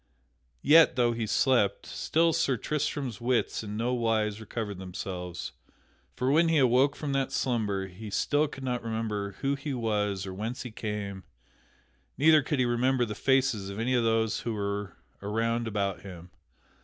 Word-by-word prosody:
Yet, 155 -2 +7
though 120 -2 +3
he 115 -1 -2
so 105 - +1
slept, 120 -7 +2
still 165 +1 +1
Sir 135 -4 +1
Tristram's 140 -4 -3
wits 120 -1 0
in 105 0 -5
no 120 +3 0
wise 110 -3 0
recovered 105 -3 -5
themselves; 90 -1 -6 0.6
for 130 +2 0
when 165 +3 +4
he 165 - +3
awoke 130 +2 +4
from 150 -2 -4
that 135 -1 0
slumber 105 -6 -1
he 95 +4 -9
still 145 +8 +1
could 135 - -9
not 125 -2 -1
remember 110 -3 -3
who 140 0 +1
he 140 0 -4
was 105 -4 -1
or 95 - -6
whence 110 +6 -4
he 125 - -7
came, 105 -3 -5 0.9
neither 155 +1 +6
could 150 +1 -2
he 130 - +2
remember 120 +1 +2
the 105 - -5
faces 130 -4 +1
of 100 - -6
any 120 +3 0
of 120 -2 +3
those 115 -1 +1
who 115 -2 -3
were 100 -1 -3 0.2
around 115 +3 -1
about 100 -3 -2
him. 90 -2 -11
115 Hz, 170 wpm, -28 LUFS, 105-130 Hz, 0.9 s, Yet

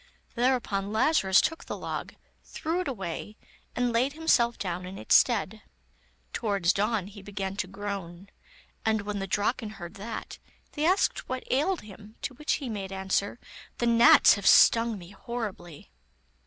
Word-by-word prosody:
Thereupon 235 -5 0
Lazarus 220 -5 +4
took 325 0 -2
the - - -5
log, - - -5 0.3
threw 330 +2 -3
it 365 - -4
away, 210 -3 -5 0.4
and 245 -1 0
laid 255 +5 +1
himself 255 -7 +2
down 180 -2 -4
in 190 +1 -8
its - - 0
stead. 220 -3 +3 0.7
Towards 200 -5 +1
dawn, 210 -1 0
he 200 +1 -11
began 195 -1 -5
to 190 - -2
groan, 195 -1 -7 0.5
and 220 -1 +1
when 205 0 -4
the 195 - -4
Draken 210 +3 -1
heard 175 +2 -9
that, 220 +3 -7 0.3
they 300 0 -2
asked 395 +6 +1
what 255 0 -3
ailed 320 +8 +1
him, 210 +1 -13
to 275 - -3
which 300 +5 -1
he 280 - -3
made 200 -4 -5
answer: 190 +3 -1 0.4
'The 240 - -1
gnats 235 +7 +7
have 200 -2 -2
stung 230 -1 +6
me 175 -1 -12
horribly. 195 - -7
210 Hz, 155 wpm, -28 LUFS, 195-245 Hz, 0.7 s, gnats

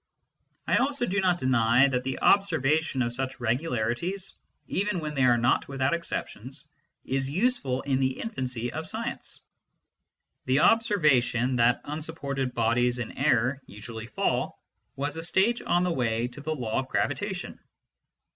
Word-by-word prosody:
I - - +3
also 275 -1 +1
do 200 -2 0
not 180 -2 +2
deny 130 -1 +4
that 125 -2 -1
the 130 0 -3
observation 155 -7 +3
of 120 0 -2
such 130 +1 -4
regularities, 125 - -1 0.3
even 200 -1 -1
when 155 -2 -4
they 140 - -1
are 120 -1 +5
not 120 +2 +2
without 135 +1 0
exceptions, 135 -5 -5 0.4
is 135 0 -1
useful 165 - 0
in 135 -2 0
the 130 -1 0
infancy 125 - -3
of - - -4
a - - -7
science: - - -5 1.0
the 130 +3 +3
observation 135 - +3
that 120 +1 +3
unsupported 145 -4 -4
bodies 120 +2 +2
in 120 -3 -5
air 125 +4 +2
usually 110 +2 -8
fall - - -1 0.4
was 145 +3 -3
a - - -3
stage 195 +8 +2
on 175 +1 +1
the 180 - +1
way 115 -3 0
to 125 +3 -10
the 155 +2 -2
law 115 -5 -2
of 130 - -3
gravitation. - - -2
135 Hz, 150 wpm, -27 LUFS, 120-165 Hz, 1.0 s, are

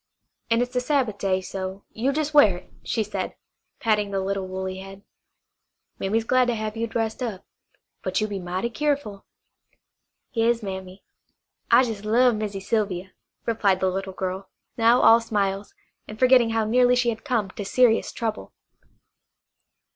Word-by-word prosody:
An' 230 +1 +3
it's 245 +1 -7
the 250 - +2
Sabbath 250 -6 0
day, 190 -1 +1
so 190 +1 -6
you 250 +5 0
jes' 305 +1 -2
wear 215 -12 +6
it," - - -16
she 225 - -1
said, 210 - -4 0.4
patting 210 -3 +1
the 195 -1 -1
little 195 0 -2
woolly 190 0 -4
head. 195 +1 -11 1.0
"Mammy's 220 +4 0
glad 255 +2 +3
to 240 - +1
have 215 0 -4
you 230 +1 -2
dressed 225 +1 -2
up; 215 -6 -4 0.6
but 185 0 -1
you 215 - +1
be 200 -2 -4
mighty 185 +6 -3
keerful." 280 -8 -2 1.1
"Yas, 230 -1 +1
Mammy. 190 -1 -7 0.7
I - - +7
jes' 220 -5 -4
love 240 +3 +4
Missy 210 -2 -3
Sylvia," 190 -3 -1 0.3
replied 205 -5 +2
the 190 -1 +1
little 195 +1 -4
girl, 190 +1 -4 0.3
now 230 +2 +4
all 230 +1 +7
smiles, 200 -3 -2 0.3
and 215 - -8
forgetting 250 -1 +5
how 225 -1 +1
nearly 245 +2 +4
she 245 -1 +2
had 220 -1 -4
come 230 -9 -1
to 205 - -6
serious 225 +3 +3
trouble. 220 -2 -4
215 Hz, 160 wpm, -24 LUFS, 195-235 Hz, 1.1 s, I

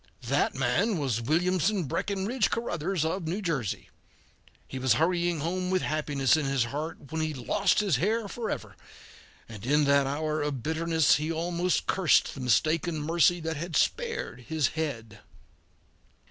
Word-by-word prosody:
That 140 +4 +1
man 145 - +1
was 130 -7 -1
Williamson 180 - +1
Breckinridge 200 - -1
Caruthers 180 -6 -1
of 165 +1 -2
New 180 +6 -2
Jersey. 150 - -3 0.8
He 130 - -6
was 130 -2 +3
hurrying 170 +3 +1
home 180 +3 -2
with 185 -1 +1
happiness 145 -2 +1
in 155 -3 -1
his 135 -3 +1
heart, 145 +3 -6
when 160 0 -2
he 155 -1 -2
lost 185 - +1
his 195 -10 +1
hair 215 - 0
forever, 195 - -5 0.7
and 105 -3 -10
in 150 +4 +3
that 140 -1 +3
hour 155 +2 -1
of 140 -5 -3
bitterness 160 -1 +2
he 155 +2 -2
almost 170 +2 0
cursed 190 -5 +3
the - - -9
mistaken 155 +6 +1
mercy 170 +3 +3
that 160 -1 -3
had 165 +1 -5
spared 465 - -1
his 160 -3 +1
head. 115 -10 -5
160 Hz, 150 wpm, -28 LUFS, 140-180 Hz, 0.8 s, was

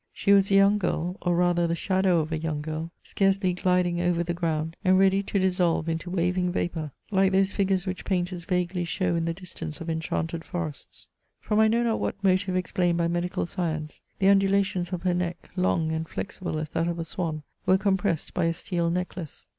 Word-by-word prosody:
She 200 - +2
was 195 -1 +5
a 195 - +3
young 200 +1 +5
girl, 180 -2 -1
or 175 -1 +1
rather 175 -1 +2
the 170 - 0
shadow 185 -1 +2
of 155 +1 -5
a 160 - 0
young 155 -2 -2
girl, 160 +2 -4
scarcely 195 -1 +1
gliding 180 -1 +1
over 175 -1 +1
the 175 0 -2
ground, 165 -2 -2
and 185 -1 +4
ready 195 +1 +4
to 200 - -2
dissolve 180 -4 +1
into 165 +2 -2
waving 180 0 0
vapour, 165 -4 -2 0.2
like 190 -1 +3
those 195 0 +3
figures 195 -2 +1
which 185 -1 -4
painters 180 -2 -2
vaguely 180 0 0
show 180 +1 -1
in 165 -1 0
the 165 - -1
distance 180 -4 -6
of 165 0 -4
enchanted 165 0 -2
forests. 160 -6 -6 0.3
From 210 - 0
I 220 - +6
know 230 +2 +2
not 230 -2 +1
what 200 - -3
motive 185 0 +2
explained 180 -1 +1
by 170 0 +1
medical 175 +1 -1
science, 160 -4 -4 0.2
the 190 - 0
undu 195 0 +5
lations 190 -2 0
of 180 -1 -4
her 180 -1 +2
neck, 175 -1 -3
long 170 -3 +1
and 160 0 -3
flexible 185 -5 -4
as 155 -1 -4
that 165 +1 0
of 170 0 -2
a 165 - -3
swan, 160 -2 -3 0.2
were 185 - +6
compressed 190 -4 0
by 180 - +1
a 165 - +2
steel 170 -1 -1
necklace. 180 -2 -4
180 Hz, 210 wpm, -26 LUFS, 165-190 Hz, 0.3 s, I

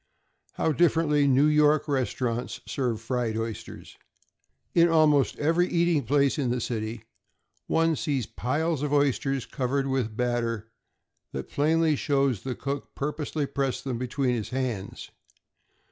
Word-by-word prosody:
How 160 - 0
differently 155 -3 +3
New 135 +2 +4
York 150 0 +4
restaurants 125 -3 -2
serve 125 -5 -2
fried 115 -1 -2
oysters! 115 -1 -6 0.8
In 170 0 +5
almost 155 -4 +3
every 165 +4 +2
eating 170 -5 +2
place 140 +3 +2
in 130 -4 0
the 125 +1 0
city, 110 -1 -4 0.6
one 165 0 +2
sees 140 -6 -1
piles 145 +7 -1
of 145 -1 -2
oysters 135 -2 +1
covered 135 0 -1
with 130 -4 0
a - - -12
batter 115 -1 -2 0.6
that - - -6
plainly 160 +1 +2
shows 135 -6 +1
the 130 -2 -4
cook 140 0 -5
purposely 150 +1 -2
pressed 135 -2 -2
them 125 -4 -3
between 125 0 0
his 115 -4 -3
hands. 125 -7 -4
135 Hz, 135 wpm, -27 LUFS, 125-150 Hz, 0.8 s, In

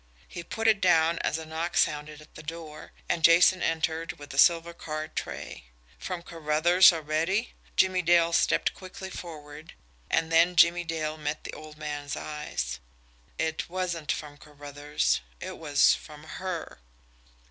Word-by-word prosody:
He 175 - -7
put 225 +6 -3
it 215 -2 +4
down 165 -2 +3
as - - -1
a 160 - -7
knock 160 +2 -3
sounded 150 0 0
at 150 - -22
the - - -10
door, 155 -1 -9 0.2
and 165 - -1
Jason 175 +2 +6
entered 160 0 -1
with 145 -1 -11
a 135 - -1
silver 170 +1 +4
card 155 -2 -6
tray. - - -6 0.3
From 180 -2 -5
Carruthers 165 +3 +4
already! 165 +7 -1 0.2
Jimmie 185 -1 +3
Dale 170 -1 +3
stepped 170 - +2
quickly 190 0 -9
forward 155 -3 -9 0.4
and 160 0 +1
then 170 +2 +4
Jimmie 175 +1 +5
Dale 155 -1 -3
met 150 0 -3
the - - -7
old 155 0 -11
man's 145 -2 -5
eyes. 150 - -4 0.6
It 160 0 -2
wasn't 175 -4 -2
from 145 -1 -5
Carruthers 145 - -2 0.2
it - - -7
was 145 -3 +4
from 150 0 -9
HER! 170 - -6
160 Hz, 150 wpm, -27 LUFS, 150-170 Hz, 0.6 s, Jason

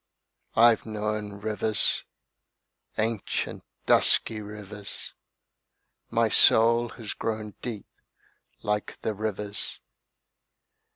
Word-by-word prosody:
I've 115 -1 +5
known 105 -1 -3
rivers: 110 -1 +2 0.9
Ancient, 110 -1 -2 0.2
dusky 110 -1 +3
rivers. 105 -1 -5 1.0
My - - +2
soul 115 +1 +5
has 110 -4 -5
grown 110 -2 -4
deep 110 -5 -5 0.8
like 105 0 -2
the 110 - 0
rivers. 105 -1 -3
105 Hz, 75 wpm, -27 LUFS, 105-110 Hz, 1.0 s, I've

